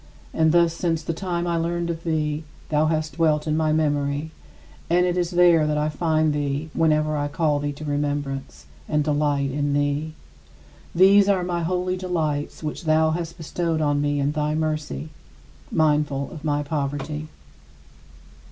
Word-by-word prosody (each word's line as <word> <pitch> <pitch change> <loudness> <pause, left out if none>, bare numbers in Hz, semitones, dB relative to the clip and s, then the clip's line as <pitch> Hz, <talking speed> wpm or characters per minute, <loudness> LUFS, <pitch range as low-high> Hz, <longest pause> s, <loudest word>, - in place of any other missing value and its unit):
And 160 -1 +3
thus 170 -1 +4
since 165 -2 -1
the 165 - -2
time 175 0 -2
I 170 -1 0
learned 170 +1 -1
of 165 0 -6
thee, 155 -2 -1 0.3
thou 155 0 +2
hast 155 -2 -2
dwelt 155 -2 +2
in 155 -1 0
my 155 -1 +1
memory, 145 0 0 0.6
and 175 +1 +4
it 175 -1 0
is 175 -2 0
there 175 -3 +4
that 150 0 0
I 150 +1 +1
find 155 0 +1
thee 145 +1 -2
whenever 155 -1 +2
I 145 -1 -1
call 150 0 0
thee 145 0 -2
to 155 +2 -9
remembrance, 145 - -3 0.2
and 150 0 +2
delight 145 -2 +1
in 145 +1 -1
thee. 145 +2 -1 0.8
These 195 +3 +6
are 190 -3 +2
my 175 -1 -2
holy 180 +2 -1
delights, 160 -6 -2
which 155 +3 -5
thou 155 0 +3
hast 170 0 -4
bestowed 165 0 -2
on 145 -2 +1
me 145 0 0
in 140 +1 +1
thy 150 0 -1
mercy, 155 - -2 0.6
mindful 150 -3 +1
of 155 -4 -9
my 145 -1 0
poverty. 145 +1 -3
155 Hz, 165 wpm, -23 LUFS, 145-165 Hz, 0.8 s, These